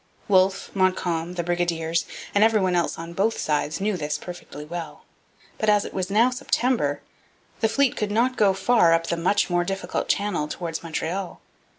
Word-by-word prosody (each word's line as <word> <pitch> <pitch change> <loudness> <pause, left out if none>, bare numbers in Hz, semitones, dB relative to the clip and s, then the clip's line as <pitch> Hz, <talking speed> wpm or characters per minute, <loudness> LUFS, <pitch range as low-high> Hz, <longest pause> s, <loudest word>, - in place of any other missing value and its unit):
Wolfe, 190 -1 +2
Montcalm, 180 -3 0
the 175 - -2
brigadiers, 170 -1 -1 0.3
and 205 - +4
every 220 -1 +4
one 185 -2 +1
else 175 -1 0
on 165 +1 -7
both 210 +5 +1
sides 150 +2 -1
knew 205 +1 0
this 150 -3 -2
perfectly 175 -4 -9
well. 170 +1 -7 0.5
But, 215 - +1
as 205 -1 +3
it - - -8
was 185 -1 -2
now 225 +5 +4
September, 245 - 0 0.6
the 220 - +2
fleet 265 +3 +2
could 210 - -2
not 240 +5 +1
go 200 -4 +3
far 195 -4 +4
up 165 0 +2
the 170 - -1
much 185 +5 +1
more 175 0 +2
difficult 195 +1 -3
channel 200 -7 0
towards 165 0 -4
Montreal. 170 +3 -4
185 Hz, 180 wpm, -24 LUFS, 165-210 Hz, 0.6 s, and